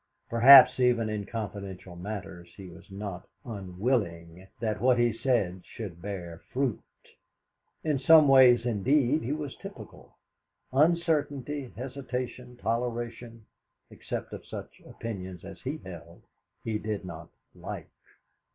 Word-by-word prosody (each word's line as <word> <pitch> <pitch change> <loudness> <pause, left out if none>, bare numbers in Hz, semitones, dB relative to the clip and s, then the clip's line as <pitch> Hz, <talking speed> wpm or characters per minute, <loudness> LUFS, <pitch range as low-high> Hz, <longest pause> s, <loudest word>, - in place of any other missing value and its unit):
Perhaps 130 +3 +9
even 120 -3 +3
in 105 -2 -4
confidential 100 -5 -6
matters 90 -2 -7
he 95 -2 -9
was 85 - -15
not 95 -2 -7 0.2
unwilling 95 -4 -3
that 110 -3 -2
what 125 0 +4
he 120 -1 +3
said 110 -7 0
should 95 -7 -8
bear 90 -4 -6
fruit. 130 -4 -1 1.0
In 150 -4 0
some 155 +2 +7
ways, 125 -3 +7
indeed, 130 +6 +2
he 120 - -3
was 150 -2 -4
typical. - - -12 0.6
Uncertainty, 145 -3 +1
hesitation, 125 -1 -5
toleration 115 -1 -3 0.5
except - - -6
of - - -7
such - - -9
opinions 95 -6 -7
as 95 -1 -10
he 135 +5 -3
held 85 - -11 0.4
he 110 -1 -2
did 105 -3 -4
not 85 -2 -9 0.2
like. - - -8
115 Hz, 120 wpm, -28 LUFS, 95-130 Hz, 1.0 s, Perhaps